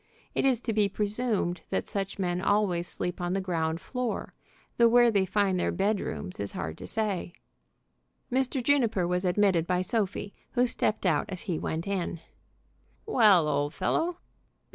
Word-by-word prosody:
It -, -, 0 dB
is 260 Hz, -4 st, +3 dB
to 230 Hz, -, -2 dB
be 210 Hz, -2 st, +3 dB
presumed 210 Hz, -3 st, -1 dB
that -, -, -1 dB
such 195 Hz, -1 st, -3 dB
men 180 Hz, -2 st, -1 dB
always 195 Hz, -4 st, +1 dB
sleep 180 Hz, +1 st, -3 dB
on 175 Hz, 0 st, -1 dB
the 195 Hz, -, +1 dB
ground 165 Hz, -3 st, -1 dB
floor, 250 Hz, +3 st, -4 dB, 0.4 s
though 235 Hz, -, +6 dB
where 240 Hz, 0 st, +5 dB
they 195 Hz, -3 st, +2 dB
find 195 Hz, -1 st, +1 dB
their -, -, +1 dB
bed 205 Hz, +1 st, +1 dB
rooms 80 Hz, -, -5 dB
it -, -, -1 dB
is -, -, -7 dB
hard 80 Hz, -3 st, -5 dB
to -, -, -7 dB
say. 205 Hz, -6 st, -2 dB, 1.0 s
Mr. 260 Hz, 0 st, 0 dB
Juniper 235 Hz, -9 st, +2 dB
was 180 Hz, +1 st, 0 dB
admitted 180 Hz, -2 st, +2 dB
by 180 Hz, 0 st, +1 dB
Sophie, 200 Hz, 0 st, -2 dB, 0.2 s
who 245 Hz, 0 st, +3 dB
stepped 215 Hz, -3 st, -1 dB
out 160 Hz, -5 st, +2 dB
as 185 Hz, -2 st, -5 dB
he 175 Hz, -7 st, -2 dB
went 160 Hz, +1 st, -3 dB
in. 185 Hz, -4 st, -2 dB, 0.9 s
"Well, 210 Hz, -, +5 dB
old 145 Hz, +1 st, 0 dB
fellow! 335 Hz, -, 0 dB
195 Hz, 170 wpm, -28 LUFS, 175-225 Hz, 1.0 s, though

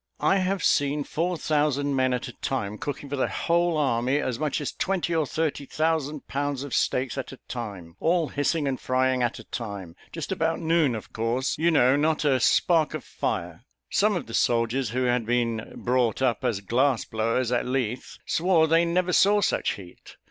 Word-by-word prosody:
I 195 Hz, -, +4 dB
have 190 Hz, 0 st, -1 dB
seen 145 Hz, 0 st, +2 dB
four 170 Hz, +5 st, -2 dB
thousand 145 Hz, -2 st, 0 dB
men 130 Hz, -1 st, +2 dB
at 125 Hz, +1 st, -2 dB
a 120 Hz, -, -8 dB
time 105 Hz, -6 st, -3 dB
cooking 145 Hz, 0 st, -5 dB
for 140 Hz, -, -3 dB
the 130 Hz, -, +1 dB
whole 170 Hz, -1 st, +1 dB
army 130 Hz, -2 st, +1 dB
as 130 Hz, -5 st, -2 dB
much 150 Hz, -2 st, -1 dB
as 145 Hz, -, -3 dB
twenty 185 Hz, -3 st, -1 dB
or 160 Hz, -3 st, +1 dB
thirty 150 Hz, -3 st, -2 dB
thousand 155 Hz, -2 st, -1 dB
pounds 140 Hz, 0 st, -2 dB
of 140 Hz, -4 st, -7 dB
steaks 130 Hz, +1 st, 0 dB
at 130 Hz, -, -5 dB
a 135 Hz, -, -10 dB
time, 100 Hz, -9 st, -7 dB
all 165 Hz, -2 st, +1 dB
hissing 145 Hz, +1 st, 0 dB
and 130 Hz, -2 st, -2 dB
frying 130 Hz, 0 st, +1 dB
at 120 Hz, -1 st, 0 dB
a -, -, -10 dB
time 100 Hz, -7 st, -6 dB, 0.2 s
just 165 Hz, 0 st, -5 dB
about 165 Hz, -3 st, 0 dB
noon, 160 Hz, -6 st, +2 dB
of 110 Hz, -, -8 dB
course, 115 Hz, +4 st, -1 dB
you 165 Hz, +2 st, +3 dB
know 135 Hz, -5 st, +4 dB
not 155 Hz, +1 st, +1 dB
a 135 Hz, -3 st, +3 dB
spark 160 Hz, +4 st, +3 dB
of -, -, -5 dB
fire! 85 Hz, +4 st, -4 dB, 0.3 s
Some 210 Hz, 0 st, +3 dB
of 170 Hz, -, -3 dB
the 115 Hz, -, -10 dB
soldiers, 115 Hz, +1 st, +1 dB
who 125 Hz, +3 st, -1 dB
had 125 Hz, -1 st, +1 dB
been 115 Hz, -2 st, -1 dB
brought 125 Hz, -3 st, 0 dB
up 125 Hz, -4 st, +1 dB
as 115 Hz, -6 st, 0 dB
glass 125 Hz, +4 st, +1 dB
blowers, 115 Hz, +2 st, -1 dB
at 125 Hz, -, 0 dB
Leith, 125 Hz, -2 st, -2 dB
swore 170 Hz, -1 st, +3 dB
they 165 Hz, +2 st, +4 dB
never 180 Hz, +1 st, 0 dB
saw 205 Hz, +1 st, +5 dB
such 205 Hz, -, +1 dB
heat. 90 Hz, -3 st, -13 dB
135 Hz, 195 wpm, -26 LUFS, 120-160 Hz, 0.3 s, saw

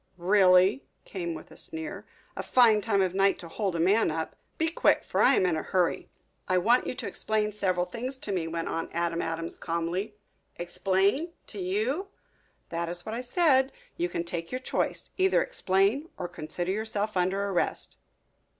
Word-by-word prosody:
"Really?" 185 Hz, +4 st, +5 dB, 0.2 s
came 170 Hz, -4 st, -4 dB
with 155 Hz, -, -11 dB
a -, -, -12 dB
sneer. 160 Hz, 0 st, -4 dB, 0.3 s
"A -, -, -3 dB
fine 225 Hz, -4 st, +5 dB
time 200 Hz, -3 st, +2 dB
of 185 Hz, -1 st, -1 dB
night 195 Hz, 0 st, +3 dB
to 170 Hz, -, -10 dB
hold 190 Hz, +1 st, -2 dB
a -, -, -1 dB
man 195 Hz, +7 st, +3 dB
up. 160 Hz, 0 st, -3 dB, 0.2 s
Be 325 Hz, -, +1 dB
quick, 325 Hz, -, +3 dB
for -, -, 0 dB
I -, -, +6 dB
am -, -, +3 dB
in 175 Hz, -3 st, +2 dB
a 155 Hz, -, -1 dB
hurry." 180 Hz, -2 st, 0 dB, 0.4 s
"I 185 Hz, -, +2 dB
want 235 Hz, +8 st, +3 dB
you -, -, -3 dB
to -, -, -4 dB
explain 215 Hz, -1 st, -1 dB
several 185 Hz, -4 st, 0 dB
things 245 Hz, +8 st, -5 dB
to 215 Hz, -, -5 dB
me," 175 Hz, -4 st, -1 dB
went 165 Hz, 0 st, -3 dB
on 165 Hz, -, -3 dB
Adam 170 Hz, 0 st, 0 dB
Adams 165 Hz, 0 st, -3 dB
calmly. 170 Hz, +5 st, -2 dB, 0.4 s
"Explain? 195 Hz, -, 0 dB
To 210 Hz, -, -9 dB
you?" 220 Hz, -, -1 dB, 0.6 s
"That 170 Hz, 0 st, -2 dB
is 175 Hz, 0 st, -4 dB
what 220 Hz, -, -4 dB
I 235 Hz, -, -2 dB
said. 265 Hz, 0 st, +3 dB, 0.2 s
You 350 Hz, +1 st, -1 dB
can 170 Hz, -, -2 dB
take 170 Hz, -1 st, -5 dB
your 255 Hz, -, -1 dB
choice. 255 Hz, -, -2 dB
Either 380 Hz, +6 st, +4 dB
explain 230 Hz, -, +1 dB
or 180 Hz, -, -3 dB
consider 175 Hz, +1 st, -4 dB
yourself 215 Hz, 0 st, -2 dB
under 190 Hz, +2 st, +1 dB
arrest." 180 Hz, -3 st, -2 dB
190 Hz, 185 wpm, -28 LUFS, 175-225 Hz, 0.6 s, I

